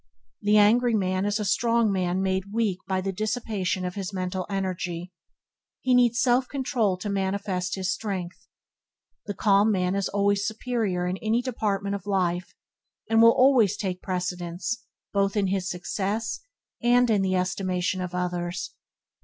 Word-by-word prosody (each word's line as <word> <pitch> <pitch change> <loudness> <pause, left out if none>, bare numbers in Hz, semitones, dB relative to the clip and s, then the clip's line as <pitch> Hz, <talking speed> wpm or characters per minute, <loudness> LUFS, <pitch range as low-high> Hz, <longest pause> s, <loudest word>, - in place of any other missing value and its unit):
The 210 +1 +4
angry 230 +3 +4
man 185 -1 0
is 205 +1 0
a 210 - -2
strong 230 +2 +2
man 185 0 0
made 190 +1 -1
weak 210 -4 0
by 190 -1 0
the 195 +1 -2
dissipation 210 -3 -2
of 180 - -3
his 195 -1 -4
mental 185 -1 -3
energy. 185 -2 -3 0.7
He 255 - +1
needs 245 -1 +4
self 250 0 +3
control 245 -8 0
to 185 - -6
manifest 190 -2 -1
his 185 -1 -1
strength. 185 -3 -5 0.8
The 205 - -3
calm 205 +2 +4
man 185 -2 +1
is 200 -1 -1
always 200 0 +2
his 200 - -1
superior 220 -5 -1
in 180 +1 -2
any 225 +4 0
department 205 -5 -1
of 200 -1 -5
life, 180 -3 -1 0.6
and 225 0 +5
will 230 - +9
always 255 -7 +4
take 185 -2 -3
precedence 180 -1 -3
of 230 - -8
him, 225 - -33 0.3
both 200 +1 +1
in 200 -2 +2
his 190 -1 -1
success, 200 +5 -2 0.4
and 245 +1 +4
in 205 -2 +3
the 190 -1 +1
estimation 185 0 -1
of 180 0 -4
others. 175 0 -3
195 Hz, 165 wpm, -26 LUFS, 185-220 Hz, 0.8 s, will